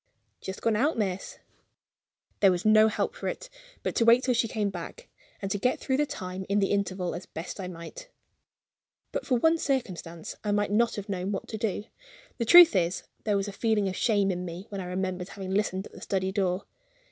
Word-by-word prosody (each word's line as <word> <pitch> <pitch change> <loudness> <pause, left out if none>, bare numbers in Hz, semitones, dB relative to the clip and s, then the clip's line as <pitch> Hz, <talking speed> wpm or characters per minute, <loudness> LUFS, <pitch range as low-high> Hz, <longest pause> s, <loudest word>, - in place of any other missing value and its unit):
"Just 190 - -7
gone 225 -2 +2
out, 280 +7 +1
miss." 195 -3 -2 1.0
There 195 - +6
was 180 +2 -2
no 215 0 +7
help 220 - -1
for - - -5
it - - -5 0.3
but - - -1
to 235 - +4
wait 235 +2 +6
till 255 -1 +2
she 230 -1 +2
came 210 -2 -1
back, 185 - -8 0.4
and 195 - -2
to 205 - 0
get 250 +5 +1
through 265 - 0
the 295 +1 +1
time 185 -3 -5
in 200 - +2
the 195 -1 +2
interval 190 -3 -1
as 180 +2 -6
I - - -41
best 165 +5 -6
might. 180 - -9 1.0
But - - -4
for 255 - +3
one 320 +6 +3
circumstance, 180 - -3
I 205 -1 0
might 205 0 +1
not 230 +2 +2
have 205 0 -6
known 190 -1 -2
what 195 - -4
to 220 - -4
do. 210 -2 -1 0.6
The 235 - 0
truth 345 +7 +9
is, 175 0 +1 0.2
there 205 -2 +2
was 195 +1 -1
a - - -4
feeling 210 -1 +1
of 185 - -5
shame 205 -3 +2
in 180 0 -3
me 175 +2 -7
when 200 -2 -4
I - - -5
remembered 185 0 -3
having 190 -2 -6
listened 195 -1 0
at - - -12
the - - -13
study 190 -1 -1
door. 190 -2 0
200 Hz, 215 wpm, -28 LUFS, 185-225 Hz, 1.0 s, truth